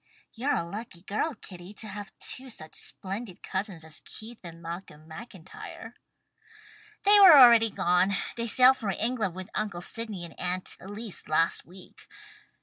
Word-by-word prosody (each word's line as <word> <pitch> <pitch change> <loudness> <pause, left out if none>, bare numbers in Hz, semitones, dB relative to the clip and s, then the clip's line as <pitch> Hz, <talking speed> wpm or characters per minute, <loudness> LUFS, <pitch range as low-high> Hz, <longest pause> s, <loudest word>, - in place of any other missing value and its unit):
"You're 260 +6 -1
a - - -1
lucky 180 0 -8
girl, 215 +9 -2
Kitty, 185 -1 -11
to 220 - -5
have 205 0 -8
two 260 0 -4
such 155 -9 -7
splendid 195 0 -6
cousins 190 -4 -4
as 160 -1 -3
Keith 225 +2 -10
and 165 -1 -10
Malcolm 170 -2 -9
MacIntyre." 185 0 -10 1.1
"They 410 +1 +7
are 365 -7 +10
already 235 -3 +8
gone. 180 0 +2 0.2
They 235 0 -3
sailed 255 +4 +6
for 215 -5 -4
England 215 -3 0
with 185 0 -8
Uncle 205 -5 -3
Sydney 210 -2 -3
and 165 - -11
Aunt 180 0 -2
Elise 205 +2 -6
last 165 +2 +2
week. 180 +1 -15
200 Hz, 150 wpm, -28 LUFS, 175-230 Hz, 1.1 s, are